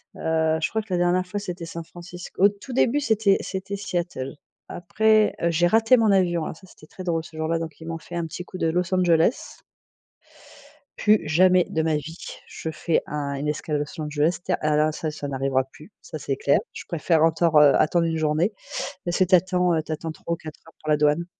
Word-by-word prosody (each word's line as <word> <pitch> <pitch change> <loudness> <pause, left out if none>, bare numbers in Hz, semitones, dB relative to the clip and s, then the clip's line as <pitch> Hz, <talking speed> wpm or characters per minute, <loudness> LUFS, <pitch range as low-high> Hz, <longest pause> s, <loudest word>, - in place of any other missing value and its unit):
heu, 160 0 0
je - - 0
crois 220 - -1
que 210 -3 -7
la - - +2
dernière 175 +1 +2
fois, 205 +3 -4
c'était 180 -4 -6
San 165 0 -7
Francisco. 175 +2 -7
Au 200 - +8
tout 205 +6 -10
début 255 +2 +2
c'était 220 -6 +3
c'était 190 +1 -5
Seattle. 175 -9 -4 0.3
Après 215 +4 +2
heu, 170 - +2
j'ai 175 +2 +3
raté 225 +6 +4
mon 220 -3 +3
avion, 175 -4 +2
alors - - -5
ça 190 - -17
c'était 155 - -17
très 185 - -10
drôle 165 -2 -1
ce 160 - -14
jour-là 160 +1 0
donc 160 -2 -7
ils 160 - -9
m'ont 165 0 -3
fait 175 +2 -10
un 170 -1 -1
petit 180 +2 -7
coup 185 - -9
de 165 - +1
Los 180 +3 -1
Angeles 175 +3 +2 1.4
plus 215 0 +4
jamais 180 +3 +4
de 160 - 0
ma 160 -1 +1
vie 155 +3 -5 0.3
je 160 - -6
fais 165 +1 0
un 145 -1 -3
une 145 +2 -3
escale 150 0 -2
Los 145 +2 -5
Angeles, 150 +3 0
ta - - 0
alors 155 0 +1
ça, 155 0 -3
ça 150 -1 -6
n'arrivera 135 -1 0
plus, 150 +8 -16
ça 155 - -8
c'est 140 - -2
clair. 140 +1 +2
Je - - -8
préfère 165 -1 +1
encore 165 0 +3
heu, 145 -2 +7
attendre 165 +2 +2
1 165 -1 -1
journée, 155 +6 +1 0.5
parce 175 0 -1
que 185 - +4
tu 185 +1 +5
attends, 180 0 +2
heu, 160 - +1
tu 160 - -8
attends 160 +1 -5
3 170 +1 -5
ou - - 0
4 155 -2 -10
heures 165 - -16
pour 155 - -6
la 150 - +4
douane 150 +3 +2
165 Hz, 225 wpm, -24 LUFS, 155-185 Hz, 1.4 s, Au